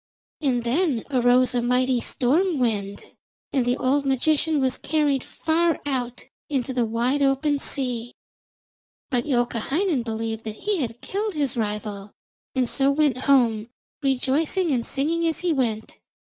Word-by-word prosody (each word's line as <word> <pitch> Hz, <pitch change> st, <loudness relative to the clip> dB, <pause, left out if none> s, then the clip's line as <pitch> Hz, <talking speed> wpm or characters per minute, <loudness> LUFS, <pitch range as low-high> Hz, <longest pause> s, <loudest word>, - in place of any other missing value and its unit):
And 255 Hz, -5 st, +1 dB
then 260 Hz, 0 st, +1 dB
arose 250 Hz, 0 st, +4 dB
a 245 Hz, -, +1 dB
mighty 250 Hz, +1 st, +1 dB
storm 315 Hz, +10 st, +1 dB
wind, 205 Hz, -5 st, -1 dB, 0.5 s
and 265 Hz, -, +2 dB
the 245 Hz, +1 st, +1 dB
old 275 Hz, +2 st, +1 dB
magician 295 Hz, +3 st, +2 dB
was 260 Hz, -1 st, 0 dB
carried 290 Hz, -3 st, +1 dB
far 330 Hz, 0 st, 0 dB
out 250 Hz, -3 st, -3 dB, 0.3 s
into 265 Hz, -3 st, -1 dB
the 245 Hz, -2 st, +1 dB
wide 240 Hz, +5 st, 0 dB
open 280 Hz, +1 st, +2 dB
sea. 245 Hz, -4 st, -1 dB, 1.0 s
But 245 Hz, 0 st, 0 dB
Youkahainen 270 Hz, -, 0 dB
believed 225 Hz, -1 st, -4 dB
that 215 Hz, -1 st, -4 dB
he 415 Hz, -1 st, +1 dB
had 240 Hz, -6 st, -4 dB
killed 410 Hz, -1 st, -3 dB
his 285 Hz, -3 st, 0 dB
rival, 210 Hz, -2 st, -4 dB, 0.4 s
and 255 Hz, -2 st, +1 dB
so 270 Hz, +3 st, +2 dB
went 280 Hz, -3 st, +2 dB
home, 235 Hz, -5 st, +3 dB, 0.3 s
rejoicing 290 Hz, +6 st, +1 dB
and 245 Hz, -4 st, 0 dB
singing 330 Hz, +5 st, 0 dB
as 325 Hz, -, -2 dB
he 355 Hz, -2 st, +1 dB
went. 230 Hz, -6 st, -2 dB
260 Hz, 145 wpm, -24 LUFS, 240-295 Hz, 1.0 s, arose